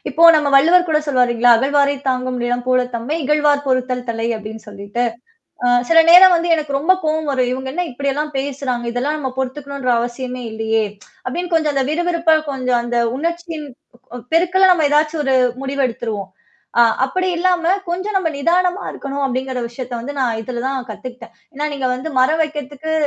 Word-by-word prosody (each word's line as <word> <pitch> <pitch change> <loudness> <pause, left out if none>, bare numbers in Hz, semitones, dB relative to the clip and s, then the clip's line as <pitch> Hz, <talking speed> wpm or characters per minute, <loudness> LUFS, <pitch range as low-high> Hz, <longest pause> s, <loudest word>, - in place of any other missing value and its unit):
இப்போ 295 +4 -1
நம்ம 300 -2 +2
வள்ளுவர் 345 +6 +5
கூட 305 - +3
சொல்வாரு 255 -4 +2
இல்லீங்களா? 240 +1 +4
"அகழவாரைத் 280 +2 +1
தாங்கும் 255 -1 -1
நிலம் 245 0 -1
போல 255 0 +3
தம்மை, 235 +6 -3
இகழ்வார் 295 0 +2
பொறுத்தல் 255 -1 -1
தலை" 225 0 -2
அப்டின்னு 220 +1 -9
சொல்லிட்டு. 205 +3 -4 0.6
அ - - +2 0.2
சில 330 - +5
நேரம் 365 +1 +9
வந்து 340 0 0
எனக்கு 300 -3 -2
ரொம்ப 320 +7 +3
கோவம் 310 0 -1
வரும். 255 -2 0
இவங்க 265 +1 -4
என்ன 355 +5 -2
இப்டில்லாம் 280 +4 -3
பேசுறாங்க? 265 -3 -3
இதெல்லாம் 270 +5 -1
நம்ம 265 -3 -3
பொறுத்துக்கணுன்ற 270 0 -3
அவசியமே 250 +1 -4
இல்லையே! 220 0 0 0.4
அப்டின்னு 350 +7 -4
கொஞ்சம் 310 -3 +1
அந்த 270 -1 +1
விறுவிறுப்பா 335 0 +1 0.2
கொஞ்சம் 255 -3 0
அந்த 240 0 -3 0.2
உணர்ச்சியின் 335 0 -4 0.7
பெருக்கலா 365 +3 +4
நம்ம 320 -4 +2
ஏதாச்சும் 300 +1 +1
ஒரு 265 -1 +2 0.3
முடிவு 275 0 -2
எடுத்துருவோம். 220 -5 -5 0.5
அ - - +8 0.2
அப்படி 370 +7 -2
இல்லாம, 360 0 +2 0.2
கொஞ்சம் 380 +4 -2
நம்ம 360 -4 -1
நிதானமா 360 +5 +1
இருக்கணும் 275 0 -4
அப்படிங்கிற 260 0 -3
விஷயத்த 250 +1 -8
வந்து 285 +5 -7
நான் 235 -4 0
இதுல 240 +1 -5
தான் 265 -2 -3
கத்துக்கிட்டேன். 235 +1 -10 0.2
ஏன்னா, 295 +2 -2
நீங்க 270 -2 -2
வந்து 255 +5 -5
மரம் 310 +5 +2
வைக்கிறதுக்கு 295 0 -6
275 Hz, 170 wpm, -18 LUFS, 250-315 Hz, 0.7 s, நேரம்